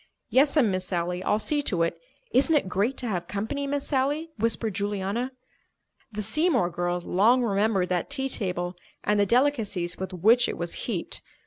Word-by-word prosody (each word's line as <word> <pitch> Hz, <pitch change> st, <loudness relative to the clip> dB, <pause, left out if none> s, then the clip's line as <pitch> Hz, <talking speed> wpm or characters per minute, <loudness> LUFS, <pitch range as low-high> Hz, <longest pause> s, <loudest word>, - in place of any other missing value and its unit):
"Yes'm, 275 Hz, -4 st, +4 dB
Miss 185 Hz, 0 st, -1 dB
Sally, 180 Hz, 0 st, -2 dB
I'll 210 Hz, -, +2 dB
see 295 Hz, +7 st, 0 dB
to 180 Hz, -11 st, +1 dB
it. 165 Hz, -, -1 dB, 0.4 s
Isn't 310 Hz, +2 st, +3 dB
it 285 Hz, -, +2 dB
great 200 Hz, +8 st, 0 dB
to 250 Hz, -, -1 dB
have 175 Hz, -5 st, -2 dB
company, 225 Hz, +8 st, -3 dB
Miss 285 Hz, 0 st, -2 dB
Sally?" 290 Hz, +4 st, +1 dB
whispered 225 Hz, -1 st, 0 dB
Juliana. 205 Hz, +5 st, -2 dB, 0.8 s
The 210 Hz, 0 st, -4 dB
Seymour 270 Hz, -, +2 dB
girls 175 Hz, 0 st, -2 dB
long 235 Hz, +7 st, +4 dB
remembered 200 Hz, -3 st, +1 dB
that 180 Hz, -1 st, -1 dB
tea 270 Hz, 0 st, -1 dB
table 180 Hz, -7 st, -2 dB, 0.3 s
and 210 Hz, 0 st, +2 dB
the 200 Hz, -, +3 dB
delicacies 225 Hz, -8 st, +1 dB
with 190 Hz, 0 st, -4 dB
which 220 Hz, +7 st, +4 dB
it -, -, -4 dB
was -, -, -4 dB, 0.2 s
heaped. -, -, -3 dB
210 Hz, 175 wpm, -26 LUFS, 185-265 Hz, 0.8 s, Yes'm